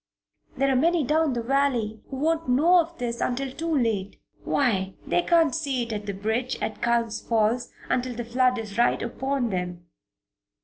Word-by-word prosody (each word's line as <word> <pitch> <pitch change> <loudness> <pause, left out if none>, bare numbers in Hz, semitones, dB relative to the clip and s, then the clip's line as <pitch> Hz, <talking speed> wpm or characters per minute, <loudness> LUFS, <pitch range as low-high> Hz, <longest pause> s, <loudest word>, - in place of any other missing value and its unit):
There 275 0 +2
are - - +2
many 330 +4 +3
down 305 +1 +2
the 235 -1 -2
valley 245 -5 0
who - - -5
won't 320 +1 0
know 325 +8 +5
of 335 0 -2
this 235 -1 -3
until 260 +2 -1
too 330 +5 -4
late. 215 -6 -1 0.2
Why, 195 -8 0
they - - +2
can't 335 -4 +3
see 280 -6 -1
it 230 -1 -5
at 210 -1 -5
the 200 - -2
bridge 220 +6 -2
at 215 - -4
Culm 235 -1 +1 0.2
Falls 230 +2 +1 0.2
until 250 -1 -1
the 240 0 -4
flood 250 +1 +2
is 215 -1 -5
right 240 - +3
upon 260 0 -2
them." 180 -1 -4
245 Hz, 180 wpm, -25 LUFS, 225-280 Hz, 0.2 s, know